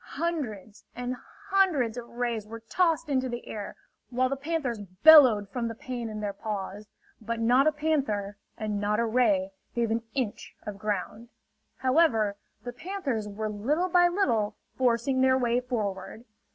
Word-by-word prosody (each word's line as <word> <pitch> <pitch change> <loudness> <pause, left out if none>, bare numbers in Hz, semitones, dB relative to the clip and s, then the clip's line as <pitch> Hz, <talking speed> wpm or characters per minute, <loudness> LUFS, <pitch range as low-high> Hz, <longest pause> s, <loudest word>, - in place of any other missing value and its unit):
Hundreds 245 - -3
and 245 +1 -3 0.4
hundreds 320 - +3
of 240 -1 -7
rays 235 -3 -3
were 230 +1 -8
tossed 330 +6 +1
into 260 -3 0
the 240 0 -6
air, 205 -2 -6 0.3
while 255 +1 +1
the 275 - -1
panthers 280 -5 -2 0.2
bellowed 260 -10 +8
from 235 +2 -2
the 230 - -5
pain 240 -1 -5
in 215 -1 -6
their 205 -1 -2
paws. 205 0 -5 0.3
But 230 +1 -3
not 250 +5 +4
a - - +5
panther 275 -10 -1 0.2
and 210 -2 -2
not 210 +1 +1
a 235 - +2
ray 215 -5 +2 0.2
gave 235 -2 0
an 230 +1 +1
inch 250 -7 -3
of 205 -1 -6
ground. 210 +3 -3 0.5
However, 255 -7 +3 0.3
the 245 0 -6
panthers 285 - -3
were 215 +2 -4
little 275 - 0
by 350 0 +5
little 235 - +1 0.2
forcing 255 +1 +1
their 260 0 +4
way 240 -1 +1
forward. 220 -3 -4
235 Hz, 160 wpm, -28 LUFS, 215-275 Hz, 0.5 s, bellowed